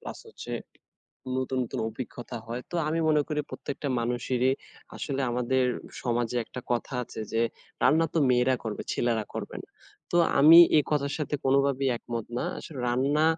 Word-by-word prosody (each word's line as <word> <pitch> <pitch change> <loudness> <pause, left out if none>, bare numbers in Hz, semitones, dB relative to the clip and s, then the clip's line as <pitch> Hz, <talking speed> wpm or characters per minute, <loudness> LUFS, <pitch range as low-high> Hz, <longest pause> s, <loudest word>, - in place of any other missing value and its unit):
Plus - - -7
হচ্ছে - - -8 0.8
নতুন, 130 0 -1
নতুন - - -4
অভিজ্ঞতা 120 +1 -7
হয়। 120 +2 -4
তো - - -8
আমি 160 +2 0
মনে 150 -1 +4
করি 150 -1 0
প্রত্যেকটা 140 0 -5
মানুষেরই 125 +2 +1 0.4
আসলে 140 -2 -3
আমাদের 125 +2 +1 0.4
সমাজে 120 0 0
একটা 125 - -8
কথা 120 +2 -2
আছে 110 - -8
যে 115 +1 +2 0.4
রান্না 160 +5 +5
তো - - +3
মেয়েরা 125 +1 +3
করবে 110 -2 -3
ছেলেরা 115 -3 0
করবে - - -5
না। - - -28 0.4
তো 175 - +1 0.2
আমি 160 +4 +9 0.2
এই 150 - +6
কথার 140 -1 0
সাথে 150 -1 -2
কোনোভাবেই 135 0 +2
একমত 115 -1 -5
না। - - -1
আসলে 145 -5 -9
রান্না 140 +5 +2
130 Hz, 160 wpm, -28 LUFS, 120-145 Hz, 0.8 s, আমি